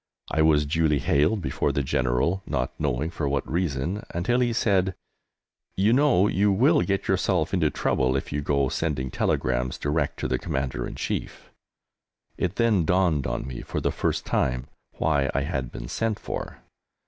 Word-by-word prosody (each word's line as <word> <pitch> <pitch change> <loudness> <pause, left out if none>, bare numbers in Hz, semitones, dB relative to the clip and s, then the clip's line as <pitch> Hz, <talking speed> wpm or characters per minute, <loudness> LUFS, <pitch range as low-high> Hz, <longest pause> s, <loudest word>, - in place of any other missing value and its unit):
I 80 - +2
was 75 -1 +4
duly 75 0 +2
haled 75 +8 +2
before - - 0
the 70 - -1
General, 65 +9 0
not 60 - -1
knowing 75 +2 -1
for 75 -5 -2
what 70 -1 -1
reason, 85 - -1
until 110 +9 +1
he 120 -1 +2
said, 95 -5 +1 0.8
"You 100 +4 +3
know 130 -8 +4
you 100 +1 +2
will 140 - +4
get 100 -1 -1
yourself 95 -3 +1
into 85 -5 +3
trouble 65 -2 0
if 70 - -3
you 75 - -1
go 70 -1 +1
sending 65 -3 -2
telegrams 60 0 0
direct 75 +1 -1
to - - 0
the - - 0
Commander 70 -5 -2
in - - -8
Chief." - - -4 0.8
It 90 +1 -2
then 110 -5 +3
dawned 85 -4 +2
on - - -3
me 65 -2 -6
for - - -4
the - - 0
first - - -1
time 65 0 0 0.3
why 70 -4 +1
I 70 - +2
had 70 -4 -3
been - - -7
sent 110 - -1
for. - - -6
80 Hz, 170 wpm, -25 LUFS, 70-95 Hz, 0.8 s, was